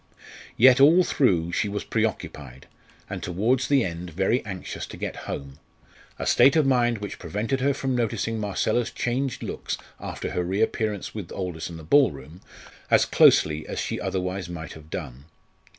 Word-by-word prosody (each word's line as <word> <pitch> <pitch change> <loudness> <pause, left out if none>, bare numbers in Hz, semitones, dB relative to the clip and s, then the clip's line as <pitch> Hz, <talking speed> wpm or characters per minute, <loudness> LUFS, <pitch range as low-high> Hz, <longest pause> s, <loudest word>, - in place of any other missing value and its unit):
Yet 130 +2 +7
all 165 +6 +7
through 90 - +1
she 105 - 0
was 105 0 -3
preoccupied, 65 -2 -3 0.4
and - - -6
towards 115 +9 0
the 140 -3 +3
end 85 0 -5
very 95 +9 0
anxious 95 -3 -6
to - - -10
get - - -4
home, 70 -1 -6 0.6
a - - -4
state 135 - +5
of 155 -3 +4
mind 120 -3 +2
which 105 -1 -7
prevented 105 - -2
her 140 +2 +3
from 135 -1 -2
noticing 115 -1 -1
Marcella's 110 +3 0
changed 125 +1 -2
looks - - -4 0.2
after - - -5
her 90 - -1
reappearance 105 +2 -1
with 100 -6 -7
Aldous 90 -4 -4
in 85 - -8
the 80 - -10
ball 140 - +5
room, 75 +6 -12 0.5
as - - +5
closely 75 0 +4
as - - -5
she - - -3
otherwise 90 -1 -3
might 80 -2 -7
have 80 0 -14
done. 65 -2 -7
100 Hz, 165 wpm, -25 LUFS, 85-125 Hz, 0.6 s, Yet